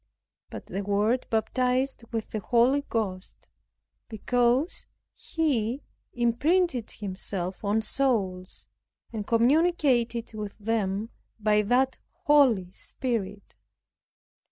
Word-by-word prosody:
But - - -8
the 195 - -4
Word 205 +5 +1
baptized 250 +3 0
with 225 -2 -4
the 215 - -2
Holy 245 +7 +3
Ghost, 195 -5 -4 0.6
because 245 - 0 0.3
He 270 -6 -1 0.3
imprinted 250 +3 +1
Himself 190 -2 -5
on 210 +2 +1
souls, 200 -10 -1 0.5
and 210 -2 -4
communicated 245 -2 +2
with 210 -2 -6
them 210 0 -1 0.3
by 210 0 +3
that 250 +5 +2 0.3
Holy 255 - +4
Spirit. 205 -2 -4
230 Hz, 90 wpm, -27 LUFS, 205-255 Hz, 0.6 s, Holy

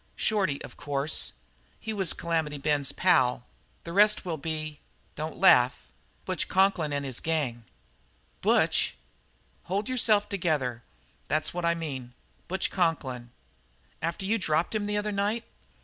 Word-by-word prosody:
"Shorty, 190 -10 +1
of - - -11
course. 145 +1 -1 0.5
He 220 - -4
was 195 -6 +2
Calamity 160 -4 -1
Ben's 145 -1 +1
pal. 125 -9 +3 0.4
The 170 - -7
rest 210 +1 +5
will 165 -3 -2
be 155 -1 -4 0.4
don't 155 +1 -5
laugh 125 - +5 0.4
Butch - - -1
Conklin 190 -5 +2
and 140 -1 -2
his 130 -3 -2
gang." 140 -8 -1 0.8
"Butch!" - - +3 0.7
"Hold 200 +4 -1
yourself 225 -5 +2
together. 150 - -1 0.5
That's 155 +1 0
what 175 -1 -2
I 170 0 +3
mean 135 -7 -6 0.3
Butch 190 +1 -1
Conklin." 135 -9 -1 0.7
"After 170 +3 -2
you 225 +3 +1
dropped 160 +1 +1
him 210 -1 -1
the 210 0 0
other 210 0 -1
night?" 205 +3 0
165 Hz, 135 wpm, -28 LUFS, 145-195 Hz, 0.8 s, rest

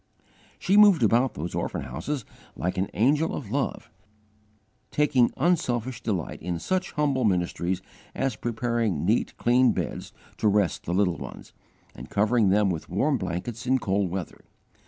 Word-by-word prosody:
She 195 +2 +2
moved 200 - +7
about 120 +4 +3
those 85 +3 -5
orphan - - -3
houses 145 -7 -4 0.3
like 90 +1 -2
an 95 - -1
angel 145 - +2
of 110 -8 -7
Love, 130 -3 -2 1.0
taking 140 -5 +3
unselfish 130 -7 0
delight 95 -7 -3
in 85 0 -3
such 185 - -2
humble 140 -4 +1
ministries 90 -2 0 0.3
as 135 -4 -1
preparing 115 -7 -1
neat, 110 +5 +1
clean 125 +1 +4
beds - - -4 0.3
to 110 - +1
rest 100 -5 +1
the 85 - -1
little 90 -4 +2
ones, - - -9 0.4
and - - -10
covering 105 0 +2
them 100 0 +3
with 80 -3 -5
warm 135 - +1
blankets 95 +6 -4
in 130 +1 +4
cold 100 -5 0
weather. 90 -1 -5
115 Hz, 150 wpm, -26 LUFS, 95-130 Hz, 1.0 s, moved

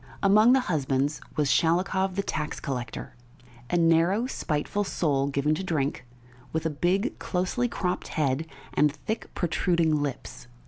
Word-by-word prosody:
Among 215 +5 +6
the 265 - +4
husbands 145 - 0
was 150 -2 +1
Shalikov, 185 +6 +2
the 200 - 0
tax 150 -5 -3
collector 125 -4 -5 0.6
a 175 - +1
narrow, 170 +6 +3
spiteful 190 - -2
soul, 140 -8 0
given 140 +2 +1
to 160 - -2
drink, 145 -7 -2 0.4
with 160 0 -2
a 160 - +1
big, 185 - 0
closely 185 +7 -1
cropped 180 -6 -2
head, 150 +1 -1 0.3
and 150 0 +3
thick, 215 +10 -5
protruding 165 -3 +1
lips. 140 -3 -5
165 Hz, 140 wpm, -27 LUFS, 145-190 Hz, 0.6 s, Among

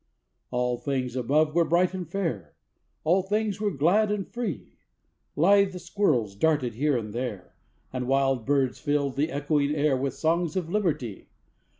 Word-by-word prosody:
All 125 -1 -1
things 130 -3 -2
above 150 +5 +2
were 170 +1 +4
bright 175 +3 +2
and 180 -4 -5
fair, 160 - -3 0.5
All 175 +5 +3
things 210 +1 -1
were 210 - +2
glad 195 +7 +2
and 205 -2 -2
free; 235 - -5 0.6
Lithe 195 +3 +4
squirrels 170 - 0
darted 145 -1 +1
here 140 +3 +1
and 105 -3 -5
there, 115 -7 -5 0.4
And 125 -1 -3
wild 135 -2 +2
birds 135 -1 +1
filled 145 -2 0
the 150 +4 0
echoing 145 0 0
air 145 -2 +2
With 135 0 -2
songs 165 +1 0
of 175 -3 -2
Liberty! 155 - -2
150 Hz, 155 wpm, -26 LUFS, 130-180 Hz, 0.6 s, were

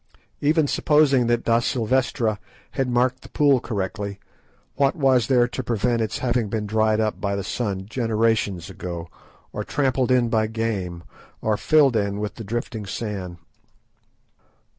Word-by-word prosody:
Even 155 +1 +3
supposing 140 -5 +3
that 120 0 +1
da 115 0 +3
Silvestra 120 -3 0 0.3
had 135 -1 -1
marked 125 +1 +1
the - - -13
pool 140 -3 +3
correctly, 100 -2 -4 0.5
what 140 +2 +2
was 135 -6 +3
there 125 -3 +4
to 130 - -4
prevent 120 0 0
its 110 0 -2
having 120 -4 0
been 110 0 -2
dried 110 +1 +2
up 110 -1 -1
by 100 -1 -1
the 100 - -3
sun 100 -2 -3
generations 110 -5 0
ago, 85 -3 -6 0.4
or - - -3
trampled 130 -3 0
in 125 -2 +3
by 110 -1 +1
game, 105 -6 -3 0.4
or 110 -1 +2
filled 145 +3 +4 0.2
with 105 0 -3
the 115 - -8
drifting 110 -1 -4
sand? 95 -4 -5
115 Hz, 145 wpm, -23 LUFS, 105-125 Hz, 0.5 s, there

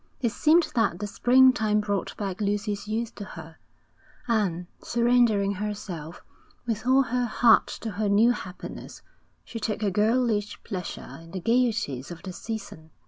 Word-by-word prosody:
It 235 -4 0
seemed 320 +7 +4
that 225 -7 +1
the 205 - -4
springtime 225 -1 +4
brought 205 -3 -2
back 195 -1 -4
Lucy's 205 0 -2
youth 225 +2 -2
to - - -8
her; 160 -4 -11 0.7
and, 195 -7 0 0.2
surrendering 235 -4 +2
herself 185 -5 -6 0.4
with 230 0 -3
all 265 +1 +5
her 245 0 -1
heart 230 0 +4
to 225 - -4
her 205 +1 -1
new 215 +4 +5
happiness, 185 -6 -8 0.4
she 230 - -7
took 215 0 -2
a 200 - +1
girlish 215 +1 +1
pleasure 180 -3 -6
in 165 - -14
the 185 - -5
gaieties 225 - 0
of 170 -1 -9
the 185 -2 -6
season. 200 -7 -7
210 Hz, 150 wpm, -26 LUFS, 195-235 Hz, 0.7 s, all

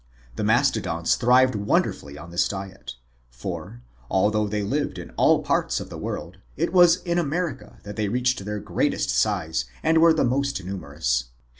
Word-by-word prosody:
The - - -3
Mastodons 110 -7 +2
thrived 125 +1 +4
wonderfully 100 -8 -1
on 85 - -10
this 85 - +2
diet; 95 -8 -7 0.4
for, - - -7 0.3
although 105 +2 +2
they 105 0 -2
lived 145 +8 -2
in - - -8
all - - +3
parts - - 0
of - - -8
the - - -6
world, 90 +3 -5 0.2
it 170 +6 -1
was 175 -1 +6
in 175 -1 0
America 155 -8 -3
that 105 +1 -8
they 105 -1 0
reached 125 -1 0
their 105 +1 -4
greatest 105 -9 -1
size 65 +2 0 0.2
and 160 0 +4
were 165 0 +7
the 160 - +2
most 135 -3 -1
numerous. 70 -10 -2
105 Hz, 165 wpm, -24 LUFS, 90-140 Hz, 0.4 s, were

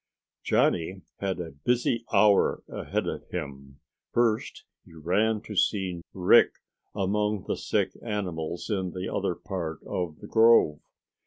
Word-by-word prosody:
Johnny 90 +3 +1 0.2
had 95 -2 -2
a 85 -2 -5
busy 115 - 0
hour 100 0 +4
ahead - - -3
of - - -5
him. 70 -5 -7 0.3
First 115 -2 0 0.2
he 80 - -17
ran 105 +7 +1
to 105 - -8
see 95 -3 0
Rick 90 -2 +5 0.4
among 105 0 0
the - - 0
sick - - 0
animals 90 -7 -4
in 95 -3 -1
the 90 0 -4
other - - -1
part 85 -4 -5
of 85 -4 -3
the - - -11
grove. 110 -10 +5
95 Hz, 135 wpm, -27 LUFS, 85-105 Hz, 0.4 s, Rick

